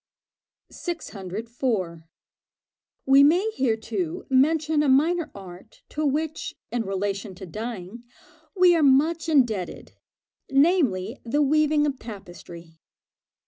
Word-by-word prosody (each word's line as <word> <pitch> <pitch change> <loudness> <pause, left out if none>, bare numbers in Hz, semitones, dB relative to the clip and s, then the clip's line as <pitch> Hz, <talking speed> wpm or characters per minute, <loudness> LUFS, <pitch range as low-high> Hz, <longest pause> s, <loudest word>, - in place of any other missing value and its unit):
604. 210 - -4 1.0
We 275 +1 +6
may 360 +9 +3
here, 255 - 0
too, 350 - -4
mention 300 +3 +3
a 295 - +1
minor 315 +4 +2
art, 190 +1 -13
to 305 - -3
which, 310 +3 -3 0.2
in 240 - -1
relation 195 0 -3
to 190 +1 -9
dyeing, 215 +3 -7 0.5
we 360 -2 +5
are 330 - +2
much 305 +4 +3
indebted, 240 - 0 0.6
namely, 275 - +2
the 290 +5 +1
weaving 300 +1 +2
of 280 -3 -2
tapestry. 175 -6 -11
260 Hz, 105 wpm, -24 LUFS, 195-310 Hz, 1.0 s, We